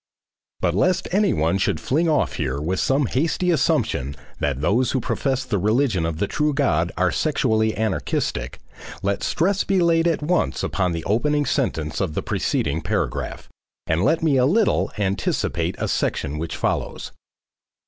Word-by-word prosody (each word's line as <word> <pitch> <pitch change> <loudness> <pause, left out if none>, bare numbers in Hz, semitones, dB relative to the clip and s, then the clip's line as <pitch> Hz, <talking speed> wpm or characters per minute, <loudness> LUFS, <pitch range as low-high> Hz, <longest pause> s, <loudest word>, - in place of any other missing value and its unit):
But 85 -2 +1
lest 180 - +1
anyone 95 - +2
should - - 0
fling 160 +5 +1
off 155 - +1
here 70 -4 -2
with 90 +5 -1
some 135 +1 +2
hasty 165 +8 0
assumption 120 - 0 0.2
that 70 -2 -1
those 105 - +1
who 130 - +1
profess 130 +2 -1
the 105 -6 -1
religion 105 -4 +1
of 80 -2 -3
the 100 - 0
true 150 +7 0
God 85 - +1
are 90 0 +2
sexually 110 -8 +1
anarchistic, 80 - -2 0.5
let 100 0 0
stress 190 +3 +1
be 195 -1 +1
laid 170 -1 +3
at 165 -3 0
once 175 +3 0
upon 90 -3 0
the 85 -1 -4
opening 145 +9 +1
sentence 80 - -1
of 90 -6 -2
the - - -2
preceding 80 +3 -1
paragraph, - - -3 0.4
and 80 +3 +1
let 160 +6 +2
me 150 -4 +3
a 125 - +4
little 215 +8 +2
anticipate 100 -1 -1
a - - -2
section 75 +3 -1
which 80 0 -4
follows. - - -2
110 Hz, 160 wpm, -22 LUFS, -, 0.5 s, a